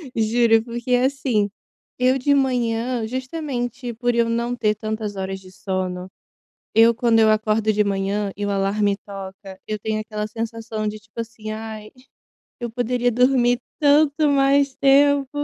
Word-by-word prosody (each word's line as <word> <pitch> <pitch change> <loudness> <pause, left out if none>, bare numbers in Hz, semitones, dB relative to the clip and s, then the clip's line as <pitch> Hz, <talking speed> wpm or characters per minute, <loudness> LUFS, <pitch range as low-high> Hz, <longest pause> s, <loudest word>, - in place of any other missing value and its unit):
Juro 225 0 +3
porque, 240 +1 -3
assim, 250 -5 +1 0.5
eu 255 +1 +2
de 285 +2 +3
manhã, 240 -3 0
justamente 255 -2 -4
por 245 +1 0
eu 235 -1 +2
não 235 +1 -1
ter, 215 -3 +1
tantas 215 -1 -4
horas 190 0 -4
de 185 -1 -15
sono, 185 -1 -4 0.7
eu 230 +1 +6
quando, 230 -2 +3
eu 220 -1 +5
acordo 215 0 +2
de 210 0 +2
manhã, 200 0 -1
e 205 - -2
o - - -2
alarme 200 +1 +1
toca, 195 -1 -9
eu 215 0 -2
tenho 215 +1 -2
aquela 215 -1 -4
sensação, 225 0 -4
de 215 0 -4
tipo, 215 +2 -13
assim, 220 -1 -6
"Ai, 215 -1 -7 0.7
eu 240 -1 -4
poderia 245 +1 0
dormir, 245 0 +3 0.2
tanto 295 +1 +4
mais 275 -1 +3
tempo." 280 0 +4
225 Hz, 150 wpm, -22 LUFS, 210-250 Hz, 0.7 s, eu